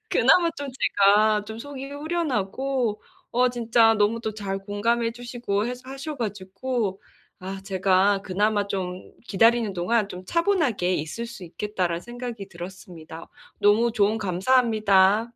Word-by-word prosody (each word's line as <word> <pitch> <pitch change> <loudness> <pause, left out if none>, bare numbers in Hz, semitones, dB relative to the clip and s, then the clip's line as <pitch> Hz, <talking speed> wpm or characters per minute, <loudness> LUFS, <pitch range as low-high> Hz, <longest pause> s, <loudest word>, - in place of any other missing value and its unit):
그나마 340 -2 +4
좀 285 -1 -5
제가 210 -3 +3
좀 220 +1 -7
속이 275 +1 -7
후련하고 270 - -2 0.3
어 250 +1 +3
진짜 230 -2 +3
너무 215 +2 +1
또 220 -2 -4
잘 195 -2 -4
공감해 230 +4 0
주시고 235 -4 -3
해서 250 +1 -5
하셔 275 +3 -6
가지고 205 0 -3 0.4
아 190 +1 -6
제가 195 +1 +2
그나마 205 +2 0
좀 185 -2 -5
기다리는 225 +1 +3
동안 200 +4 0
좀 180 0 -9
차분하게 300 - +1
있을 160 +10 -4
수 215 -5 -10
있겠다라는 180 -1 -3
생각이 240 -4 -7
들었습니다. 170 -2 -10 0.3
너무 220 +3 +4
조언 215 0 +2
감사합니다. 210 0 +3
215 Hz, 295 characters per minute, -25 LUFS, 195-240 Hz, 0.4 s, 그나마